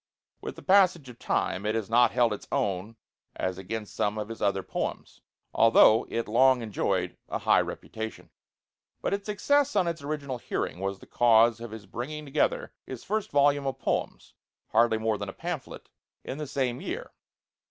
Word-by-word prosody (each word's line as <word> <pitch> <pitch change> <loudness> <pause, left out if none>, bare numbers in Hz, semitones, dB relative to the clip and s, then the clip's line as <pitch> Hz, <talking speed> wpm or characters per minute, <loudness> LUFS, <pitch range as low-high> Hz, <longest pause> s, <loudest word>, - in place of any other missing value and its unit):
With - - -6
the - - -12
passage 185 -7 +4
of 120 - -13
time 95 - -1
it 105 +1 0
has 110 -3 -2
not 120 +2 +5
held 120 -3 +2
its 105 - -8
own 100 +3 -1 0.4
as 95 0 -3
against 105 +3 -6
some 105 +3 0
of 105 0 -4
his 115 - -8
other 100 -2 +1
poems, - - -5 0.3
although 115 0 +6
it 115 - -2
long 125 +2 +4
enjoyed 95 -4 -1
a - - -1
high - - +4
reputation; 110 0 -7 0.7
but - - 0
its 200 +1 -3
success 285 +6 +2
on 185 -4 +3
its 170 -2 -3
original 140 -3 -4
hearing 90 - -3
was 95 0 -2
the - - -15
cause 115 -1 +4
of 120 0 -7
his 110 -1 -9
bringing 150 +9 -6
together - - 0
his - - -7
first 215 -1 -2
volume 145 0 +3
of 135 - -2
poems, - - -3 0.4
hardly 115 0 +3
more 110 -1 -1
than 100 -1 -4
a - - -7
pamphlet, 170 -5 -6 0.4
in 135 - -6
the 150 - -4
same 130 -3 -1
year. - - -5
120 Hz, 180 wpm, -28 LUFS, 105-145 Hz, 0.7 s, although